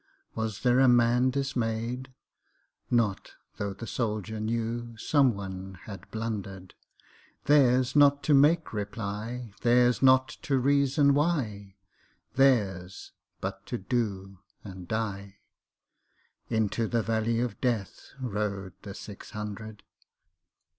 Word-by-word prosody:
Was 110 -1 -3
there 125 +1 +3
a 135 - +6
man 120 +1 +4
dismay'd? 125 -2 -2 0.8
Not 115 -5 0 0.2
tho' 100 -1 -3
the 115 - -7
soldier 110 -2 -3
knewSome 115 +4 0
one 95 -1 -7
had 100 -3 -10
blunder'd:Theirs 115 +5 -1
not 145 -1 +5
to 150 - +3
make 150 +3 +4
reply, 105 +2 -5
Theirs 120 0 +4
not 130 -1 +5
to 135 - 0
reason 140 +1 +3
why, 120 - -1 0.6
Theirs 100 -9 +1 0.3
but - - -5
to - - -3
do 100 -3 -3 0.2
and 95 -3 -9
die:Into 110 +1 -5
the 115 -1 0
valley 115 +1 0
of 120 -4 -3
DeathRode 105 -4 -3
the 100 -2 -8
six 105 -2 -10
hundred. 105 0 -7
115 Hz, 100 wpm, -28 LUFS, 100-130 Hz, 0.8 s, a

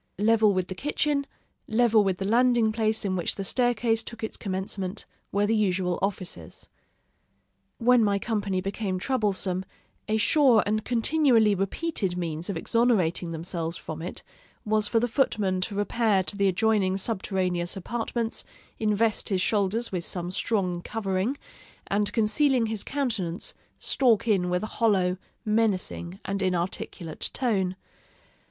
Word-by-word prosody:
Level 215 +1 +4
with 185 -2 -1
the - - -5
kitchen 285 +5 -1 0.4
level 225 -1 +4
with 190 -2 0
the 195 - -3
landing 235 0 +3
place 220 -1 0
in 190 -1 0
which 175 - -1
the 195 - -4
staircase 235 +1 +1
took 230 0 -9
its 220 - -4
commencement 190 0 -4 0.3
were 200 +1 +2
the 225 +2 +2
usual 185 -4 +1
offices. 190 -2 -4 1.1
When 245 0 +4
my 200 -1 +2
company 200 -3 -1
became 195 0 -2
troublesome, 195 -5 0 0.4
a 215 +1 +1
sure 235 0 +5
and 215 +1 0
continually 240 -3 +3
repeated 195 - -1
means 165 0 -3
of 195 - -2
exonerating 190 -5 +1
themselves 165 0 -4
from 160 0 -7
it 175 - -6 0.4
was 215 0 +2
for 225 - +2
the 240 - +1
footman 210 -7 0
to 200 +2 -2
repair 205 -1 +1
to 200 - -1
the 200 0 +2
adjoining 195 -1 +2
subterraneous 185 -3 -1
apartments, 230 +3 -3 0.4
invest 215 0 +1
his 190 -3 +1
shoulders 210 +4 0
with 180 -3 -2
some 175 0 -2
strong 185 -3 0
covering, 200 +5 -2 0.5
and 205 +1 0
concealing 235 +3 +2
his 220 -2 -2
countenance, 225 -10 -2 0.2
stalk 235 -5 +2
in 190 -5 +2
with 180 +2 0
a 215 - -8
hollow, 190 -5 +3 0.3
menacing, 200 -4 -1
and 195 +1 -2
inarticulate 175 -2 -2
tone. 195 -8 0
205 Hz, 140 wpm, -26 LUFS, 185-225 Hz, 1.1 s, sure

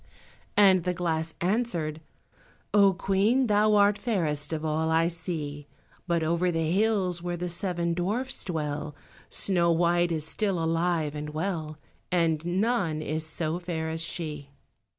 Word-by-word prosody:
and 190 -3 +6
the 180 0 -1
glass 160 -2 -2
answered— 175 -6 -1 0.7
"Oh, 200 -2 +6
Queen, 195 +7 +2
thou 210 -1 +3
art 205 0 +4
fairest 155 -11 -1
of 160 -1 -3
all 160 +1 0
I 165 +1 +3
see, 155 -4 -4 0.4
But 170 -2 +1
over 170 +3 +1
the 165 -2 0
hills, 190 -3 +1
where 175 0 -3
the 180 +1 -3
seven 170 -1 -1
dwarfs 215 +10 -2
dwell, 150 -3 -3 0.3
Snow 175 -3 +2
white 175 +1 +2
is 155 -2 -1
still 200 +1 0
alive 165 -2 0
and 150 0 -5
well, 155 -1 -3 0.3
And 165 -3 +2
none 180 -3 0
is 155 +1 -2
so 160 +1 -2
fair 165 -3 -3
as 160 0 -3
she." 155 -3 -4
170 Hz, 145 wpm, -27 LUFS, 160-190 Hz, 0.7 s, and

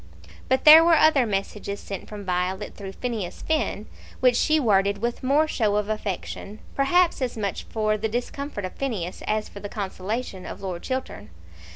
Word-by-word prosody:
But 260 0 +2
there 315 +2 +11
were 335 0 +5
other 290 -6 +5
messages 200 0 -3
sent 195 - -7
from 205 -2 -8
Violet 180 +1 -2
through 195 -2 -8
Phineas 225 -7 -4
Finn 305 -9 -1 0.3
which 250 -1 +4
she 310 +5 +3
worded 200 -5 +2
with 235 +3 -3
more 285 +4 +3
show 215 -8 +1
of 210 0 0
affection, 210 0 -4 0.2
perhaps 335 +4 +2
as 250 -3 -2
much 200 -3 -3
for 215 -1 -1
the 220 +1 -1
discomfort 245 -1 -4
of 185 - -6
Phineas 205 -10 -4
as 215 0 0
for 200 - -10
the 205 0 -7
consolation 200 0 -4
of - - -8
Lord 180 -3 -4
Chiltern. 260 0 -5
215 Hz, 175 wpm, -25 LUFS, 200-260 Hz, 0.3 s, there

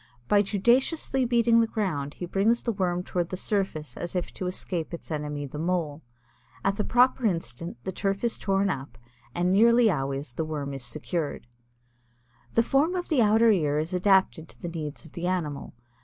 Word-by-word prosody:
By 205 - +5
judiciously 250 - +2
beating 235 -1 +4
the 230 - +3
ground 150 -11 -2
he 175 - -5
brings 205 +6 +1
the 235 - 0
Worm 180 -4 -1
toward 175 -2 -2
the 185 - -4
surface 190 -7 -2
as 175 +1 -5
if 180 - -2
to 185 - -4
escape 175 -2 -3
its 170 - -11
enemy, 150 -1 -3
the 145 +2 -7
Mole. 165 -3 -1 0.6
At 195 +1 +1
the 210 - 0
proper 250 +3 +3
instant 165 - -3
the 190 - -3
turf 195 +2 -2
is 235 - 0
torn 195 0 +1
up 135 -5 -6 0.4
and 175 +1 +1
nearly 230 +2 +5
always 135 -3 -3
the 160 - -2
Worm 145 -3 -4
secured. 150 +5 -4 1.1
The 230 - +4
form 285 +9 +2
of 355 -1 -3
the 295 -7 +3
outer 220 +1 +5
ear 150 -7 +1
is 155 +4 -2
adapted 185 -3 +2
to - - -15
the 175 - -5
needs 155 -2 -6
of 160 - -13
the 175 +1 -4
animal. 155 -9 -3
180 Hz, 185 wpm, -27 LUFS, 155-215 Hz, 1.1 s, By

